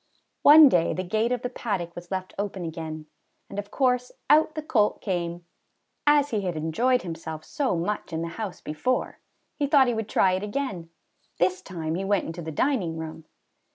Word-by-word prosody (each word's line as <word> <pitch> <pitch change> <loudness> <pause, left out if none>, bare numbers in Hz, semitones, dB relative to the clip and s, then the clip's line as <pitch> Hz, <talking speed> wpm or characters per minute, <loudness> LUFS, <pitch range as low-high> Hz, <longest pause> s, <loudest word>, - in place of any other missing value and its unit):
One 300 +1 +10
day 175 -9 +2
the 185 - -2
gate 220 +6 0
of 250 -1 -1
the 250 - -1
paddock 195 -9 -3
was 175 0 -9
left 185 -1 -4
open 195 -3 -3
again, 160 -1 -6 0.5
and 200 - -4
of 205 0 -6
course 250 -2 +1 0.2
out 310 +1 +5
the 310 - -4
colt 215 -8 +2
came. 175 -2 -3 0.6
As 290 -1 +4
he 215 -3 0
had 180 -3 -2
enjoyed 235 +12 +1
himself 160 -2 -6
so 270 -9 -1
much 190 +3 -3
in 165 0 -2
the 170 - -3
house 200 +2 -6
before, 155 +12 -2 0.4
he 285 - +1
thought 275 -2 +5
he 240 - +1
would 220 -1 -3
try 190 - +3
it 185 +1 0
again. 205 -6 -4 0.5
This 185 +1 +1
time 160 -4 -4
he 185 +3 -2
went 200 0 +1
into 165 +1 -6
the 160 -1 -5
dining 180 - 0
room. 160 0 -7
190 Hz, 190 wpm, -26 LUFS, 170-250 Hz, 0.6 s, One